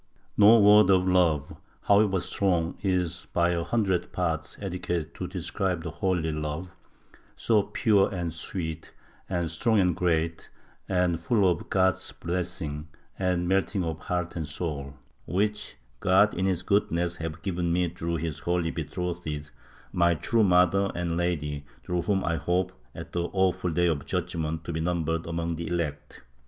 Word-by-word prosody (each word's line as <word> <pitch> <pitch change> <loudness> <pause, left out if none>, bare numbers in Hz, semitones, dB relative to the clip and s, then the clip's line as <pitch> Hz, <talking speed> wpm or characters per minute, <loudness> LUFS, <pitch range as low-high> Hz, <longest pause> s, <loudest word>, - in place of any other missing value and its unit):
— - - -39
"No 115 +3 +9
word 105 -1 +7
of 95 -1 +4
love, 85 -6 +2 0.3
however 100 -2 +4
strong, 90 -4 0
is 90 -3 -1
by 85 0 +3
a 85 -1 0
hundredth 95 -4 0
part 80 -3 -2
adequate 90 -4 -3
to - - -5
describe 90 -3 -2
the 85 - -4
holy 90 -3 0
love, 75 +3 -4 0.6
so 110 -3 +3
pui'e 100 -1 +2
and 85 -4 -3
sweet 80 -1 -5 0.4
and 85 -3 -1
strong 110 +6 +2
and 90 -3 +3
great 85 -2 0 0.4
and 90 -3 +1
full 100 +3 +2
of 90 - -1
God's 95 -1 +1
blessing 80 -4 -4 0.3
and 90 -2 0
melting 95 +1 +1
of 80 -1 -3
heart 90 +1 -3
and 80 -3 -4
soul, 70 -4 -4 0.3
which 105 +3 -1 0.2
God - - +4
in 95 +2 0
his 90 -2 0
goodness 90 -4 +1
has 80 -1 -4
given 90 -3 -1
me 90 +1 +2
through 85 0 -3
His 80 -2 -3
holy 85 +1 0
betrothed, 85 -5 -4 0.4
my 85 -1 +3
true 115 +8 +1
Mother 95 +1 +4
and 85 -1 -1
Lady, 75 -5 -1 0.2
through 90 +5 -1
whom 95 +1 0
I 85 -1 0
hope, 90 +2 0 0.2
at - - -8
the 85 0 0
awful 95 -1 +1
Day 90 +2 +1
of 80 -5 0
Judgement, 80 -3 -2
to 85 - -5
be 80 - -2
numbered 80 -1 -1
among 85 0 -2
the 85 0 -4
elect. 80 -6 -4
85 Hz, 160 wpm, -27 LUFS, 80-95 Hz, 0.6 s, No